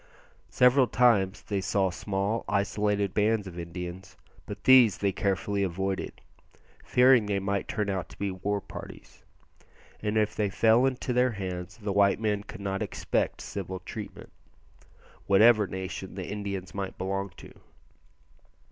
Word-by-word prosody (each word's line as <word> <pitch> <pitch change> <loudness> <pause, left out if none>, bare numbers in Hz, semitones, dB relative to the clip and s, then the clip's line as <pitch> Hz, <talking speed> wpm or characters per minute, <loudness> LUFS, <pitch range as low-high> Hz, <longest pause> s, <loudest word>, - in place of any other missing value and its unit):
Several 125 +1 +4
times 105 -6 +2
they 100 -2 -2
saw 95 0 +1
small 100 +4 -2
isolated 100 -1 0
bands 105 0 +1
of 90 -2 -8
Indians; 90 +2 -7 0.3
but 100 -1 -8
these 125 -6 +7
they 100 -1 0
carefully 100 0 -1
avoided, 95 +1 -3 0.6
fearing 125 -3 +5
they 100 -1 0
might 100 0 -2
turn 105 -2 -2
out 95 -3 -3
to - - -14
be 100 -1 -2
war 100 +2 -2
parties, - - -11 0.8
and 105 0 -1
if 105 0 +1
they 105 -2 0
fell 115 +5 +4
into 130 -1 -2
their 125 0 +2
hands 90 -2 -6
the 105 -3 -3
white 100 0 +3
men 105 -2 0
could 105 +1 -10
not 95 -1 -3
expect - - -2
civil 95 -1 -5
treatment, 105 +3 -8 1.0
whatever 105 +1 +5
nation 95 0 -6
the 95 -2 -5
Indians 100 -4 -5
might 100 -1 -5
belong 95 +1 -2
to. - - -13
100 Hz, 145 wpm, -28 LUFS, 95-105 Hz, 1.0 s, these